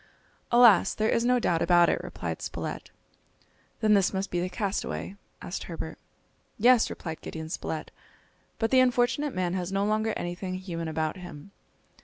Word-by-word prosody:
"Alas! 235 -6 +6
there 220 +1 +1
is 230 - +2
no 250 +1 +3
doubt 170 -8 +1
about 175 0 +5
it," - - +1
replied - - -5
Spilett. - - -5 0.9
"Then 215 -1 +4
this 195 -2 +3
must 195 0 -3
be 175 - 0
the 180 +1 -2
castaway?" 200 -1 -3 0.3
asked 175 - -5
Herbert. 165 -2 -6 0.6
"Yes," 240 +1 +5
replied 160 -2 -6
Gideon 160 0 -7
Spilett, 160 -1 -4 0.7
"but 225 - -1
the 260 - +6
unfortunate 255 +2 +2
man 180 -1 -1
has 185 0 -3
no 195 +1 +1
longer 215 +1 0
anything 175 +1 -4
human 170 -3 -5
about 160 +1 -2
him!" 175 -1 -10
190 Hz, 160 wpm, -27 LUFS, 175-220 Hz, 0.9 s, Alas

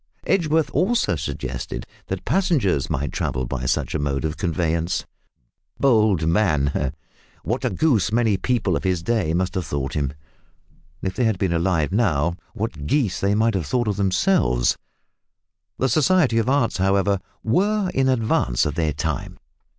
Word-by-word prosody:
Edgeworth 160 -3 +1
also 205 - +1
suggested 65 -4 -5 0.2
that - - -4
passengers 140 - +1
might 70 +2 -2
travel 65 0 -2
by 65 +1 -3
such - - 0
a 80 - -1
mode 70 0 -1
of 80 0 -2
conveyance. 85 -1 -1 0.7
Bold 110 - +3
man! 75 -7 +1 0.5
What 120 +5 -2
a 125 - +1
goose 110 - +1
many 115 -2 +2
people 105 -3 0
of - - -3
his 90 -3 0
day 90 -6 0
must 95 +2 0
have 95 -5 -3
thought 70 -2 -3
him. 70 -3 -1 0.9
If 95 - -1
they 125 - +1
had 110 -3 +1
been 95 -2 0
alive 85 -2 +1
now, 85 -7 +1 0.2
what 80 -9 -4
geese 120 - +1
they 100 +1 +1
might 115 +1 +2
have 90 -7 -2
thought 120 -2 0
themselves. 95 - +2 1.0
The 130 - +1
Society 135 -2 +3
of 115 - 0
Arts, 130 -7 +1
however, 95 +1 +2 0.2
were 195 - +1
in 130 0 +2
advance 110 - +1
of 75 - -1
their 80 -1 0
time. 75 -1 -3
95 Hz, 155 wpm, -22 LUFS, 80-120 Hz, 1.0 s, Bold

